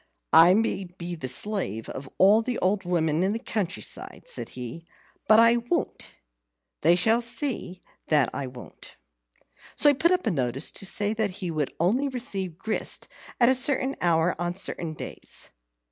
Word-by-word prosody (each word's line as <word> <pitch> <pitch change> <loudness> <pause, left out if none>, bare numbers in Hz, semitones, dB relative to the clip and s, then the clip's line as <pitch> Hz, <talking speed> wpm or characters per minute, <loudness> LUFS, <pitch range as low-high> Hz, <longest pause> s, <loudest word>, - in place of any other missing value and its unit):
"I 175 +3 +8
may 210 -3 0
be 175 0 -7
the 155 -6 -5
slave 130 - -2
of 135 0 -7
all 205 +4 +6
the 245 +1 -3
old 190 +1 0
women 160 -3 +1
in 190 +2 +1
the - - -1
country 210 -5 -3
side," - - -6
said - - -6
he; 125 +7 -7 0.4
"but 215 +1 +7
I 230 +1 +6
won't 235 -6 -3 0.7
they 170 +3 +5
shall 225 +6 +3
see 235 - -1 0.2
that 145 -5 +3
I 135 - -4
won't." 125 -1 -12 0.8
So 295 - +5
he - - +5
put 330 +5 +2
up 365 0 +1
a - - +1
notice 135 -2 -2
to 195 - -4
say 205 +2 0
that 220 -1 0
he 180 -3 -4
would 150 -3 -3
only 225 - +2
receive 200 - -3
grist 215 +3 -1 0.3
at 240 - +6
a - - +5
certain 265 +1 +3
hour 170 0 +2
on 175 0 -2
certain 170 -4 -2
days. - - -8
190 Hz, 175 wpm, -26 LUFS, 165-230 Hz, 0.8 s, I